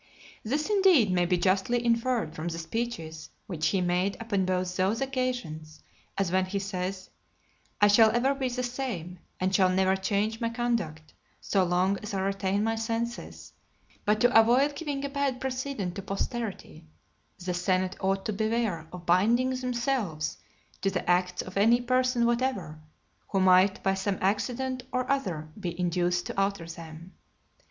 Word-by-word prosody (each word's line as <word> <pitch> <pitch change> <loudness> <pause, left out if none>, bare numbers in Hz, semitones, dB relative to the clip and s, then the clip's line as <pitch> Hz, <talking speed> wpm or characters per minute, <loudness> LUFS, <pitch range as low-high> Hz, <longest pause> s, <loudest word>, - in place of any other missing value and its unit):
This, 285 +7 -1
indeed, 380 - +4
may 175 -1 +2
be 180 0 +2
justly 195 +7 +1
inferred 235 -6 +1
from 160 +2 -5
the 165 -1 -3
speeches 165 -4 -4 0.2
which 170 -7 -1
he 195 - +1
made 180 +2 0
upon 205 -5 0
both 185 0 -1
those 195 +5 +1
occasions; 245 -13 -3 0.3
as 195 -3 0
when 185 0 +2
he 190 +2 -3
says, 190 -1 -4 0.7
"I 205 - +6
shall 220 +2 +6
ever 240 +5 +2
be 270 -2 -2
the 250 +1 -3
same, 235 -9 -4 0.2
and 185 +1 0
shall 190 -1 +4
never 190 +1 +3
change 205 +3 -1
my 230 - +1
conduct, 225 -11 -2 0.3
so 195 -2 +1
long 185 +2 +1
as 210 -2 -5
I 190 - 0
retain 195 +1 0
my 225 +1 +1
senses; 220 - -4 0.5
but 210 +1 +2
to 245 0 +4
avoid 255 +6 +4
giving 285 -3 -3
a - - 0
bad 280 -2 -1
precedent 260 -8 -3
to 200 - -5
posterity, 195 -5 -5 0.5
the 180 -1 -3
senate 185 +1 0
ought 195 0 0
to 215 - -1
beware 215 -6 -1
of 180 -1 -9
binding 225 +9 +3
themselves 245 - -2 0.4
to 195 - +2
the 190 -2 -3
acts 180 0 +1
of 185 - -10
(234) 200 - +1
any 235 +3 +5
person 255 -1 +2
whatever, 235 -10 -1 0.5
who 195 - 0
might 185 +1 +4
by 195 - +2
some 195 0 -1
accident 250 +6 -1
or 255 -1 -1
other 180 - -2
be 175 -3 -5
induced 175 0 0
to 195 - -1
alter 195 -3 -1
them." 165 +1 -10
195 Hz, 165 wpm, -28 LUFS, 180-240 Hz, 0.7 s, I